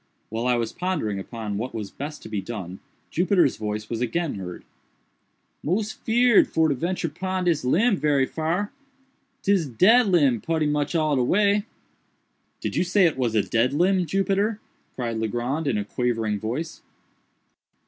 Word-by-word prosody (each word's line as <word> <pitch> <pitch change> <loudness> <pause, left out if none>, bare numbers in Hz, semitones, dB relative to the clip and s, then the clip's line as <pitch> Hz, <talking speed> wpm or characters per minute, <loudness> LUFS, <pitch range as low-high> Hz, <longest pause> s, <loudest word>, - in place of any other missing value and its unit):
While 115 +3 -2
I 125 - +3
was 115 -2 -2
pondering 155 - -2
upon 105 0 -5
what 125 +2 -4
was 105 -3 -5
best 150 +2 -7
to - - -8
be 105 - -3
done, 95 -5 -7 0.3
Jupiter's 180 -4 +2
voice 105 0 -4
was 115 0 -4
again 155 +6 -1
heard. 90 -3 -7 1.0
"Mos 205 +7 -1
feerd 240 -1 +4
for 160 -1 +2
to - - +2
ventur 170 +5 -2
pon 185 +2 -2
dis 170 -4 +1
limb 200 - +3
berry 145 -4 +2
far—'tis 265 - -3
dead 210 - +5
limb 145 - +3
putty 160 -1 0
much 150 +1 0
all 155 -2 +2
de 130 - +2
way." 205 - +2 1.0
"Did - - -3
you - - +2
say 185 +1 +3
it 165 - +2
was 120 -4 -1
a 105 - +3
dead 115 +7 +1
limb, 180 +3 +2
Jupiter?" 195 +4 0 0.4
cried 120 -3 -3
Legrand 120 +8 -2
in 120 -6 +1
a 105 - -2
quavering 115 -3 -1
voice. 130 +10 -4
150 Hz, 160 wpm, -24 LUFS, 115-190 Hz, 1.0 s, dead